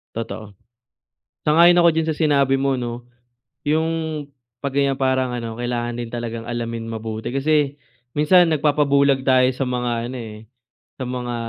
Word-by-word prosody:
Totoo. 110 -2 -6 0.9
Sang-ayon 170 +3 +6
ako 170 0 +6
diyan 160 0 -1
sa 160 - 0
sinabi 140 -4 +3
mo 135 -1 0
'no. 120 0 -5 0.6
'Yong 160 0 -1 0.3
'pag 140 +1 -4
ganiyan 140 -1 +1
parang 130 -1 +1
ano, 115 -2 -4
kailangan 120 0 -3
din 120 -1 -5
talagang 115 -1 -4
alamin 115 -1 -4
mabuti 110 0 -5
kasi 145 +1 +1 0.3
minsan 165 +5 +4
nagpapabulag 140 -2 +2
tayo 130 -1 +4
sa 135 - -1
mga 120 -2 -2
ano, 130 - -6
eh, 110 -2 -8 0.6
sa - - -7
mga 125 -1 -4
130 Hz, 145 wpm, -21 LUFS, 120-150 Hz, 0.9 s, Sang-ayon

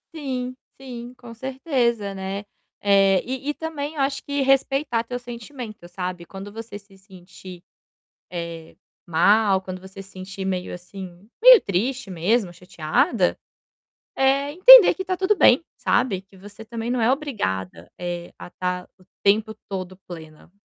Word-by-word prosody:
Sim, 255 -4 -4 0.3
sim, 245 -2 -8
com 240 -2 -11
certeza, 240 -5 -1
né. 195 +1 -4 0.4
Eh, 195 -2 +4
e 265 +3 -4
e - - 0
também 310 -1 -5
eu 285 - -2
acho 275 0 -1
que 285 -1 -2
respeitar 270 -2 +1
teu 245 +1 -5
sentimento, 235 -4 -9
sabe. 180 -1 -5
Quando 195 +3 -9
você 220 -1 -8
se 200 -1 -21
sentir, 185 -2 -13 0.7
eh, 170 -2 -7 0.3
mal, 195 +4 +3
quando 185 -1 -7
você 190 +1 -10
se 195 - -15
sentir 190 +1 -7
meio 185 -1 -3
assim, 180 +2 -10
meio - - +10
triste 215 +5 -2
mesmo, 185 +2 0
chateada, 180 - 0 0.8
eh, 275 +2 +2
entender 445 +3 +9
que 380 - -4
está 370 -1 -2
tudo 385 +3 +2
bem, 275 -4 +5
sabe. 235 -7 0
Que 195 0 -22
você 205 +3 -12
também 230 +1 -5
não 250 0 0
é 230 +3 +4
obrigada, 95 - -3
eh, 175 -1 -5
a - - -9
estar 180 0 -4
o 185 - -22 0.2
tempo 215 +2 +2
todo 185 -1 -5
plena. 160 -2 -11
210 Hz, 150 wpm, -23 LUFS, 185-260 Hz, 0.8 s, meio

